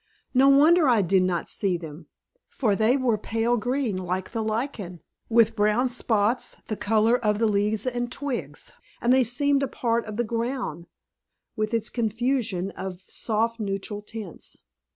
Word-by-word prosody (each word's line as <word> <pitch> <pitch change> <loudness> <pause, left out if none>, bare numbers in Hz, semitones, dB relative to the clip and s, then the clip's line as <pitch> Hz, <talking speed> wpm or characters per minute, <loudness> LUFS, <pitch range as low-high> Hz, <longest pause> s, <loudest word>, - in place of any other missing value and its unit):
No 270 +1 +6
wonder 300 +2 +6
I 225 -5 +4
did 190 +1 +3
not 180 -2 -1
see 190 -3 0
them; 160 -1 -10 0.4
for 215 -7 0
they 225 +6 +3
were 240 -5 +1
pale 225 +3 0
green 245 -2 -1
like 185 0 -3
the 230 - -2
lichen, 215 - -3 0.3
with 230 -1 +4
brown 210 +5 +2
spots 230 -1 0
the 215 - -3
color 225 +4 +2
of 210 -1 +2
the 225 - +2
leaves 210 +1 +1
and 245 -1 -2
twigs, 275 -2 -4 0.3
and 240 +2 +3
they 260 0 +5
seemed 275 +4 +2
a 275 - 0
part 235 -2 -1
of 215 -1 -7
the 240 - +1
ground, 230 - -3 0.7
with 215 0 -1
its 230 -1 -1
confusion 225 -4 -1
of 185 -1 -7
soft 230 +1 -1
neutral 205 0 -3
tints. 210 -5 -9
225 Hz, 160 wpm, -25 LUFS, 205-245 Hz, 0.7 s, No